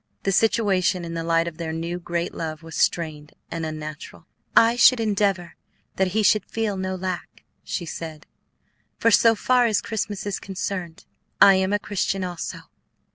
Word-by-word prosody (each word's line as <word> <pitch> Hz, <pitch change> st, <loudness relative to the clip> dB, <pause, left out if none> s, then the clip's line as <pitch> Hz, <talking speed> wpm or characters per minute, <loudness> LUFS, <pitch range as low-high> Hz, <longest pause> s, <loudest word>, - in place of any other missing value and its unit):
The 195 Hz, -, +1 dB
situation 190 Hz, -4 st, +2 dB
in 165 Hz, -, -6 dB
the 165 Hz, 0 st, -3 dB
light 165 Hz, 0 st, +2 dB
of 165 Hz, -2 st, -6 dB
their 165 Hz, -1 st, -3 dB
new, 165 Hz, +2 st, -4 dB
great 170 Hz, 0 st, -3 dB
love 155 Hz, -1 st, -5 dB
was 165 Hz, 0 st, -9 dB
strained 155 Hz, -3 st, -1 dB, 0.2 s
and 165 Hz, -1 st, -3 dB
unnatural. 155 Hz, -1 st, -8 dB, 0.3 s
"I 230 Hz, +1 st, +6 dB
should 245 Hz, +1 st, +6 dB
endeavor 200 Hz, -5 st, 0 dB, 0.4 s
that 190 Hz, -, +2 dB
he 215 Hz, +4 st, 0 dB
should 215 Hz, +1 st, +3 dB
feel 220 Hz, -3 st, -1 dB
no 190 Hz, 0 st, -3 dB
lack," 185 Hz, -1 st, -5 dB, 0.2 s
she 170 Hz, -, -4 dB
said; 160 Hz, -2 st, -7 dB, 0.7 s
"for 230 Hz, -, +3 dB
so 230 Hz, +1 st, +5 dB
far 245 Hz, +2 st, +3 dB
as 215 Hz, -2 st, +2 dB
Christmas 210 Hz, -2 st, -4 dB
is 205 Hz, -1 st, -2 dB
concerned, 185 Hz, -3 st, -5 dB, 0.3 s
I 195 Hz, -, +9 dB
am 190 Hz, 0 st, +1 dB
a 205 Hz, -, +3 dB
Christian 195 Hz, -2 st, -2 dB
also." 175 Hz, -2 st, -5 dB
185 Hz, 170 wpm, -24 LUFS, 165-205 Hz, 0.7 s, I